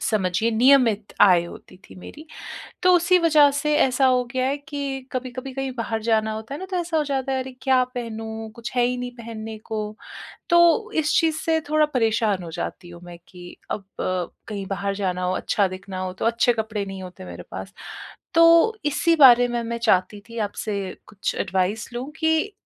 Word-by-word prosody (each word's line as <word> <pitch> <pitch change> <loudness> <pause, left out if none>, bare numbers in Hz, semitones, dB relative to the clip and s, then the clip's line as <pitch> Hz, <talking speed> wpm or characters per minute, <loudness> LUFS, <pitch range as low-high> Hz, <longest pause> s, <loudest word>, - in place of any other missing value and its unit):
समझिए 205 +1 0
नियमित 230 -3 +3
आय 180 -4 +6
होती 170 +1 -12
थी - - -13
मेरी, 300 - -11 0.6
तो 365 0 +5
उसी 355 +1 +4
वजह 310 -4 +5
से 300 +1 0
ऐसा 265 +1 +3
हो 250 -1 +3
गया 255 0 0
है 280 +2 0
कि 280 -2 -4
कभी-कभी 255 +1 -5
कहीं 270 0 -3
बाहर 225 -1 -2
जाना 220 -1 +1
होता 220 +5 -6
है - - -6
ना 375 - -6
तो 370 - -1
ऐसा 340 -1 -2
हो 305 - +2
जाता 270 -2 -2
है 265 - 0
अरे 260 0 -9
क्या 260 -2 +3
पहनूँ 225 -2 -6
कुछ 235 0 -7
है 245 - +4
ही 250 0 -1
नहीं 250 0 -4
पहनने 225 -2 -7
को, 215 -1 -5 0.5
तो 345 +6 +4
इस 305 -1 +1
चीज़ 320 -1 +1
से 320 -1 +1
थोड़ा 310 0 +4
परेशान 220 -5 +1
हो 165 - -7
जाती 175 +2 -6
हूँ 175 0 -12
मैं 175 -1 -11
कि 175 -1 -12
अब - - -2
अ, 185 -2 -3 0.2
कहीं 200 -3 -5
बाहर 200 +1 -2
जाना 185 -2 -2
हो, 185 +1 0
अच्छा 200 -2 +1
दिखना 185 0 -8
हो 185 0 -3
तो 190 - -5
अच्छे 235 +1 +3
कपड़े 215 -2 -3
नहीं 195 -1 -7
होते 180 - -10
मेरे 90 0 -9
पास, 95 0 -7 0.6
तो 335 +6 +6
इसी 330 +3 +2
बारे 245 -4 +7
में 240 -1 -2
मैं 235 0 -4
चाहती 205 -3 +1
थी 230 - -7
आपसे 205 +1 -4 0.3
कुछ 205 -1 -4
एडवाइस 190 +3 -1
लूँ 255 +4 -5
कि 320 +5 +1
230 Hz, 200 wpm, -23 LUFS, 200-280 Hz, 0.6 s, बारे